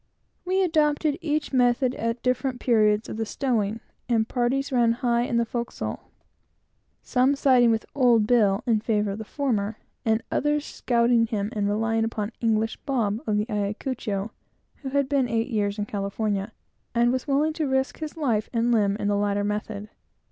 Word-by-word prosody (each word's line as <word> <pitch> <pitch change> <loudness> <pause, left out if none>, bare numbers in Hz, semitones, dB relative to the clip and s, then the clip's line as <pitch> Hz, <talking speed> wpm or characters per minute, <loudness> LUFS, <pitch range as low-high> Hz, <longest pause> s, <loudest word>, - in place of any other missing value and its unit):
We 380 +1 +2
adopted 305 -2 +1
each 305 -3 -2
method 250 0 +3
at 230 0 -3
different 255 0 0
periods 215 -3 +2
of - - -6
the 225 - -1
stowing, 225 -5 -1 0.3
and 225 -2 +2
parties 260 +4 0
ran 240 -3 +3
high 235 0 +1
in 235 - -1
the 235 - +2
forecastle, 235 +1 -5 0.9
some 260 +2 +2
siding 255 -4 +4
with 225 -1 +1
"old 240 -5 +4
Bill" 210 -4 +3
in 225 -3 +2
favor 210 -2 0
of 200 - -5
the - - -4
former, 220 -5 -2 0.3
and 220 0 +1
others 295 +1 0
scouting 235 -1 +2
him, 210 -2 -2
and 205 -1 0
relying 225 +2 +1
upon 220 -1 -3
"English 225 -1 +1
Bob" 230 -6 -1
of 210 -1 +1
the 210 - +1
Ayacucho, 210 -1 -3 0.5
who 270 - -6
had 280 0 +1
been 270 -3 +1
eight 230 +2 0
years 205 -3 -1
in 205 - -2
California, 200 0 -2 0.4
and 240 +1 +4
was 255 +3 -2
willing 295 +3 +2
to 310 -2 -2
risk 265 0 0
his 310 +1 -6
life 235 -9 0
and 235 0 +1
limb 205 -4 +2
for 205 - -4
the 205 0 +2
latter 205 0 0
method. 210 0 -3
230 Hz, 175 wpm, -25 LUFS, 210-260 Hz, 0.9 s, siding